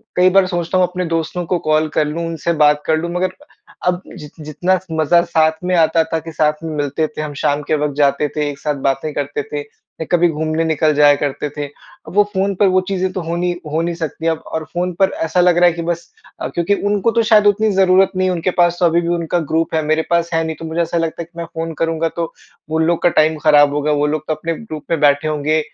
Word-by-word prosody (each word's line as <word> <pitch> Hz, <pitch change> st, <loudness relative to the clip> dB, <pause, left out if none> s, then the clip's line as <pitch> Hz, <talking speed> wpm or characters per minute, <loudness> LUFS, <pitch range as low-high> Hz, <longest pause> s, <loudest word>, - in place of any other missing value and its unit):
कई 180 Hz, +1 st, +5 dB
बार 190 Hz, 0 st, +4 dB
सोचता 175 Hz, 0 st, -1 dB
हूँ 180 Hz, -1 st, +3 dB
अपने 180 Hz, 0 st, -4 dB
दोस्तों 165 Hz, +2 st, -2 dB
को 175 Hz, 0 st, -1 dB
कॉल 155 Hz, 0 st, +3 dB
कर 155 Hz, -, +3 dB
लूँ 165 Hz, +3 st, -3 dB
उनसे 165 Hz, +1 st, -2 dB
बात 150 Hz, 0 st, +3 dB
कर 160 Hz, -, +2 dB
लूँ 170 Hz, +2 st, -3 dB
मगर 185 Hz, +1 st, -1 dB, 0.5 s
अब 180 Hz, 0 st, +1 dB, 0.2 s
जि 150 Hz, -3 st, -10 dB
जितना 165 Hz, +5 st, 0 dB
मज़ा 160 Hz, +2 st, +3 dB
साथ 160 Hz, -1 st, +1 dB
में 180 Hz, 0 st, +1 dB
आता 165 Hz, -1 st, +3 dB
था 165 Hz, -, +1 dB
कि 165 Hz, +1 st, -9 dB
साथ 150 Hz, -1 st, +2 dB
में 160 Hz, -1 st, -4 dB
मिलते 145 Hz, +2 st, -1 dB
थे, 155 Hz, -, -7 dB
हम 150 Hz, -1 st, -5 dB
शाम 145 Hz, +1 st, 0 dB
के 155 Hz, -, 0 dB
वक़्त 150 Hz, -1 st, -1 dB
जाते 145 Hz, 0 st, +2 dB
थे, 150 Hz, -1 st, 0 dB
एक 140 Hz, -1 st, -8 dB
साथ 150 Hz, -, -2 dB
बातें 135 Hz, +3 st, -3 dB
करते 420 Hz, -, -3 dB
थे, 440 Hz, 0 st, -5 dB, 0.5 s
कभी 175 Hz, 0 st, +4 dB
घूमने 160 Hz, +1 st, -1 dB
निकल 155 Hz, -1 st, +2 dB
जाया 145 Hz, -1 st, +6 dB
करते 145 Hz, +1 st, -3 dB
थे। 145 Hz, -, -2 dB, 0.4 s
अब -, -, -9 dB
वो 205 Hz, -, +6 dB
फ़ोन 195 Hz, +1 st, 0 dB
पर 200 Hz, +1 st, +3 dB
वो 185 Hz, 0 st, +3 dB
चीज़ें 190 Hz, -1 st, -1 dB
तो 185 Hz, -, -3 dB
हो 165 Hz, +1 st, -3 dB
नहीं 175 Hz, 0 st, -1 dB, 0.2 s
हो 160 Hz, +2 st, 0 dB
नहीं 170 Hz, 0 st, -2 dB
सकती 165 Hz, 0 st, -4 dB
अब 160 Hz, -1 st, 0 dB
और 160 Hz, -, -2 dB
फ़ोन 180 Hz, +1 st, -1 dB
पर 190 Hz, 0 st, +4 dB, 0.2 s
ऐसा 170 Hz, +3 st, 0 dB
लग 175 Hz, -1 st, +4 dB
रहा 175 Hz, -, +5 dB
है 175 Hz, -, +2 dB
कि 170 Hz, -, -5 dB
बस 170 Hz, 0 st, -4 dB, 0.3 s
अ, -, -, -1 dB
क्योंकि 170 Hz, +3 st, 0 dB, 0.2 s
उनको 205 Hz, +2 st, +1 dB
तो 230 Hz, 0 st, +2 dB
शायद 215 Hz, -2 st, +5 dB
उतनी 215 Hz, +2 st, +3 dB
ज़रूरत 190 Hz, 0 st, +4 dB
नहीं 185 Hz, 0 st, +1 dB
है। 185 Hz, -, 0 dB
उनके 175 Hz, +2 st, -1 dB
पास 175 Hz, 0 st, +3 dB
तो 180 Hz, -, +3 dB
अभी 170 Hz, 0 st, +3 dB
भी 170 Hz, -, -4 dB
उनका 170 Hz, +1 st, -1 dB
ग्रुप 160 Hz, 0 st, 0 dB
है 160 Hz, -, +2 dB
मेरे 155 Hz, +1 st, +2 dB
पास 170 Hz, 0 st, +1 dB
है 165 Hz, 0 st, +1 dB
नहीं 160 Hz, -1 st, -3 dB
तो 165 Hz, -, -7 dB
मुझे 160 Hz, +2 st, -1 dB
ऐसा 170 Hz, +1 st, -1 dB
लगता 165 Hz, 0 st, -2 dB
है -, -, -5 dB
कि 170 Hz, +1 st, -22 dB
मैं 170 Hz, -, -3 dB
फ़ोन 165 Hz, 0 st, -5 dB
करूँगा 165 Hz, 0 st, 0 dB
तो 170 Hz, -1 st, -3 dB, 0.4 s
वो 160 Hz, +1 st, 0 dB
लोग 165 Hz, +1 st, +1 dB
का 175 Hz, -, +5 dB
टाइम 155 Hz, -1 st, +2 dB
ख़राब 145 Hz, -2 st, +5 dB
होगा, 150 Hz, +1 st, 0 dB
वो 145 Hz, 0 st, +1 dB
लोग 155 Hz, 0 st, -3 dB
तो 155 Hz, -, 0 dB
अपने 165 Hz, +2 st, -3 dB
ग्रुप 155 Hz, -10 st, -8 dB
में 165 Hz, -, +1 dB
बैठे 145 Hz, +1 st, +3 dB
होंगे 155 Hz, +1 st, 0 dB
165 Hz, 260 wpm, -18 LUFS, 155-175 Hz, 0.5 s, जाया